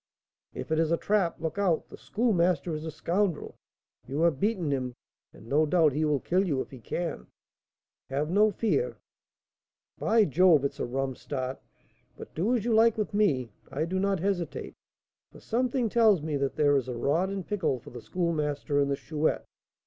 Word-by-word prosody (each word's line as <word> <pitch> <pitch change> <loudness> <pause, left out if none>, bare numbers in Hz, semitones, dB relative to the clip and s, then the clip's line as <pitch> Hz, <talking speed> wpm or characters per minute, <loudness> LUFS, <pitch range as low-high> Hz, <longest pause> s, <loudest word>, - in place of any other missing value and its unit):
"If - - -6
it 160 - +2
is 165 0 +1
a 170 - +3
trap, 200 -4 0
look 160 +4 -3
out! 180 -5 +1
The - - -11
Schoolmaster 180 - +1
is 155 +1 -4
a - - -3
scoundrel. 175 +2 -1 0.5
You 140 +4 -2
have 165 -5 +2
beaten 190 -7 0
him, 130 -3 -2 0.4
and, - - -15
no 150 +6 +2
doubt, 160 -3 +4
he 155 +3 +1
will 150 -2 +1
kill 185 +8 +1
you 150 -9 0
if - - -5
he 130 - -10
can." 165 +8 -4 0.8
"Have 145 +4 -1
no 210 +3 +5
fear." 235 - 0 1.0
"By 220 -1 +4
Jove! 160 -2 +4
it 140 - +1
is - - -21
a - - -1
'rum 135 +2 -2
start;' 130 0 -5 0.6
but - - -10
do 210 +10 +1
as 230 -3 -2
you 240 - +1
like 225 0 +5
with 215 -1 -2
me. 140 - +1 0.2
I 150 +4 -2
do 185 +3 -2
not 195 -1 +1
hesitate, 185 -1 -2 0.6
for - - -14
something 245 +1 0
tells 215 -7 +4
me 155 -1 -2
that 140 -1 -1
there 145 -1 +3
is 130 -2 0
a 125 -2 -4
rod 160 +10 +1
in 195 -1 -3
pickle 185 -9 -1
for 120 - -13
the 120 -1 -8
Schoolmaster 150 -2 -1
and 140 0 +2
the 140 - +1
Chouette. 155 +2 -1
165 Hz, 195 wpm, -28 LUFS, 140-200 Hz, 1.0 s, no